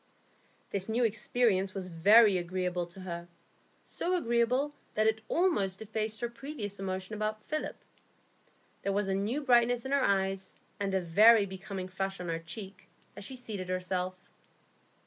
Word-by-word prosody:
This 195 +1 -2
new 235 +3 +2
experience 215 -3 +1
was 185 -2 -4
very 200 +4 +6
agreeable 180 0 -2
to 185 +2 -12
her, 170 -2 -6 0.6
so 365 +1 -1
agreeable 250 +1 +1 0.2
that 215 - +2
it 220 0 +2
almost 205 - +1
effaced 220 0 -3
her 240 - 0
previous 235 -5 -6
emotion 190 +1 -4
about 215 0 -2
Philip. 310 0 -3 1.1
There 200 - -1
was 205 0 0
a 195 - 0
new 215 +10 -1
brightness 245 -1 +3
in 265 - -4
her 280 0 +3
eyes, 195 -2 0 0.2
and 195 -1 -1
a 190 - +2
very 210 +5 +6
becoming 190 0 -6
flush 195 +1 -3
on 180 -1 -5
her 165 0 -1
cheek, 190 +3 -9 0.3
as - - -8
she 260 +6 -7
seated 210 -7 -6
herself. 185 0 -2
200 Hz, 155 wpm, -31 LUFS, 185-230 Hz, 1.1 s, very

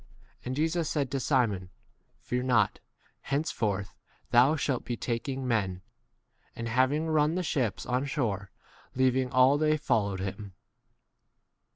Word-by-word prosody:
And 130 - -3
Jesus 160 +2 0
said 140 -4 -1
to 135 - -1
Simon, 115 -10 +1 0.5
Fear 125 0 -2
not; 120 -5 +2 0.4
henceforth 105 -9 -2 0.4
thou 130 +6 +5
shalt 140 -4 0
11 - - -22
be 120 - -3
taking 130 +3 -3
men. 95 -6 -1 0.7
And 115 - -4
having 130 +6 +2
run 155 0 +2
the 185 - -1
ships 130 - -1
on 125 +2 0
shore, 110 - -2 0.5
leaving 130 0 +2
all 130 +3 +5
they 155 0 +3
followed 100 -9 0
him. 95 +1 -5
130 Hz, 135 wpm, -29 LUFS, 110-145 Hz, 0.7 s, thou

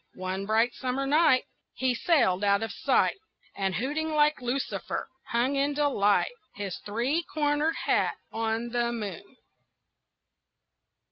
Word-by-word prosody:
One 185 +1 -4
bright 225 +3 +3
summer 260 +1 -2
night 295 -2 +4 0.3
He 260 -1 +1
sailed 235 - +2
out 200 +1 +3
of 225 - -3
sight, 390 - +1 0.4
And, 190 -2 -1
hooting 295 +8 -1
like 300 -2 +3
Lucifer, 250 +2 -3 0.2
hung 245 +4 +1
in 280 +1 +1
delight 270 - +2 0.2
His 200 -3 -5
three 240 +10 -1
cornered 300 +1 +1
hat - - +2 0.2
on 225 +1 -1
the 240 0 0
moon. 235 - -6
245 Hz, 125 wpm, -28 LUFS, 210-290 Hz, 0.4 s, night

